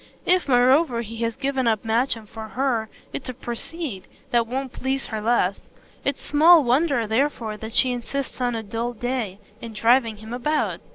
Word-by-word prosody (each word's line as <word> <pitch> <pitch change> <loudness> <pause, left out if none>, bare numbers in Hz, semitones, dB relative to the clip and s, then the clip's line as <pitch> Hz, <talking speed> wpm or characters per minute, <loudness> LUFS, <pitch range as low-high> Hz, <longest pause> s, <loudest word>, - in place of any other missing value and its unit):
If 365 -2 +3
moreover 255 0 +4
he 230 0 -7
has 230 -1 -1
given 270 -2 -1
up 220 -2 +1
Matcham 225 0 0
for 220 +1 -8
her 230 0 -1 0.2
it's 260 - -5
a 255 - -5
procede 240 - -5 0.2
that 235 -1 +3
won't 260 +2 -3
please 265 +1 -2
her 220 -2 -4
less. 210 -4 0 0.3
It's 280 - -1
small 315 +2 +6
wonder 260 -1 +2
therefore 225 -1 0
that 220 +2 -7
she 255 - +4
insists, 255 +2 -4
on 245 -1 +1
a 225 - -3
dull 230 +3 -3
day, 240 -4 -3 0.2
in 230 -1 -7
driving 230 +1 +3
him 220 +2 -9
about. 295 +5 -1
240 Hz, 175 wpm, -23 LUFS, 225-270 Hz, 0.3 s, small